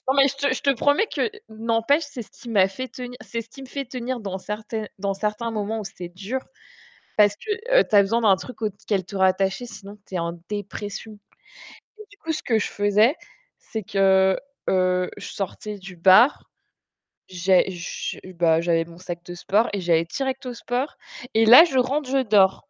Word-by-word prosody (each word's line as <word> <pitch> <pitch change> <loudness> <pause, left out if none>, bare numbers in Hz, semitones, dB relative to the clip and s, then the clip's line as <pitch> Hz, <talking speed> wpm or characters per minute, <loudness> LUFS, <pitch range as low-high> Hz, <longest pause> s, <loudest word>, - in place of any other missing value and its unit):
non, 265 - +3
mais 275 0 +6
je 275 -1 -1
te 275 -1 +3
promets 285 - +3
que 450 - -1 0.2
n'empêche, 230 +7 +1
c'est 245 -4 -7
ce - - -19
qui 240 - -13
m'a 195 -4 +4
fait 255 +7 -6
tenir 250 0 -8
c'est 230 +2 -4
ce 230 - -25
qui 270 - -12
me 265 - -10
fait 275 +1 -4
tenir 250 -1 -4
dans 195 -2 -4
certains 215 +2 -5
dans 195 0 -1
certaine 210 +2 0
certains 230 +2 -5
moments 215 +1 -2
où - - -6
c'est 175 -2 -8
dur, 200 +9 -4 0.8
parce 205 -1 +5
que, 430 - -6 0.3
heu, - - +5
tu 210 - +2
as 200 - +9
besoin 225 +4 +1
d'un 205 -4 +5
truc 250 +2 -10
auquel 200 -3 -2
te 195 - -9
rattacher, 190 +4 +1
sinon 210 -3 -11
tu 190 - -7
es 180 - 0
en 170 0 -2 0.2
dépression. 205 +1 -5 0.9
Donc 430 - -12
du 405 - -19
coup, 325 - -4
ce - - -4
que 225 -4 +2
je - - -1
faisais, 205 +6 +3 0.4
c'est 220 -2 -6
que, 190 0 +3 0.3
heu, 185 -1 +2
je - - -8
sortais 205 +1 -5
du 190 -1 -11
bar, 190 - +5 0.8
j'ai 185 +1 +3
je 175 -1 -5 0.2
bah 165 -1 +3
j'avais 165 -1 +1
mon 170 0 -14
sac 175 -1 -6
de 175 - -7
sport 205 +6 +1
et 200 - -2
j'allais 170 -1 +2
direct 265 +7 -3
au 250 - -4
sport. 245 +4 -3 0.4
Et 225 0 +4
là, 250 +9 +10
je 270 -7 -2
rentre, 260 +2 +1
je 270 0 +2
dors! 200 -5 +3
210 Hz, 205 wpm, -23 LUFS, 190-250 Hz, 0.9 s, là